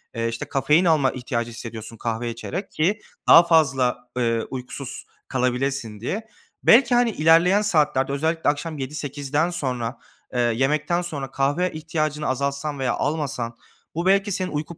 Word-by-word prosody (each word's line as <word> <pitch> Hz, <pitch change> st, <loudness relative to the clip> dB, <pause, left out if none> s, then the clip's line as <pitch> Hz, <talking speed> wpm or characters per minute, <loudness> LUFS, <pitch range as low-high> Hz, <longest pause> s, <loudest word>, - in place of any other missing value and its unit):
Eee, 115 Hz, 0 st, -1 dB
işte, 115 Hz, 0 st, -4 dB
kafein 150 Hz, +5 st, +3 dB
alma 150 Hz, -6 st, +3 dB
ihtiyacı 120 Hz, -2 st, -3 dB
hissediyorsun 115 Hz, -1 st, -7 dB
kahve 115 Hz, +1 st, -3 dB
içerek 140 Hz, -, -5 dB
ki 195 Hz, +7 st, +1 dB, 0.3 s
daha 170 Hz, -, +9 dB
fazla, 140 Hz, -7 st, +3 dB, 0.2 s
eee, 115 Hz, -2 st, +1 dB
uykusuz 130 Hz, +1 st, -6 dB, 0.2 s
kalabilesin 125 Hz, -3 st, -1 dB
diye. 210 Hz, -, -4 dB, 0.4 s
Belki, 245 Hz, +1 st, +6 dB
hani, 240 Hz, -1 st, +3 dB
ilerleyen 170 Hz, +5 st, +4 dB
saatlerde 150 Hz, -8 st, +2 dB
özellikle 160 Hz, +2 st, 0 dB
akşam 150 Hz, +2 st, -3 dB
yedi 135 Hz, +2 st, -5 dB
sekizden 145 Hz, +3 st, -1 dB
sonra, 125 Hz, -7 st, -3 dB, 0.4 s
eee, 125 Hz, -, -1 dB
yemekten 135 Hz, +9 st, +1 dB
sonra 145 Hz, -6 st, -5 dB
kahve 145 Hz, +7 st, 0 dB
ihtiyacını 155 Hz, -1 st, -2 dB
azaltsan 140 Hz, +2 st, -2 dB
veya 130 Hz, -2 st, 0 dB
almasan 140 Hz, -6 st, -2 dB, 0.4 s
bu 170 Hz, +2 st, -2 dB
belki 200 Hz, +1 st, +3 dB
senin 185 Hz, 0 st, -2 dB
uyku 155 Hz, +3 st, -4 dB
145 Hz, 145 wpm, -23 LUFS, 125-165 Hz, 0.4 s, daha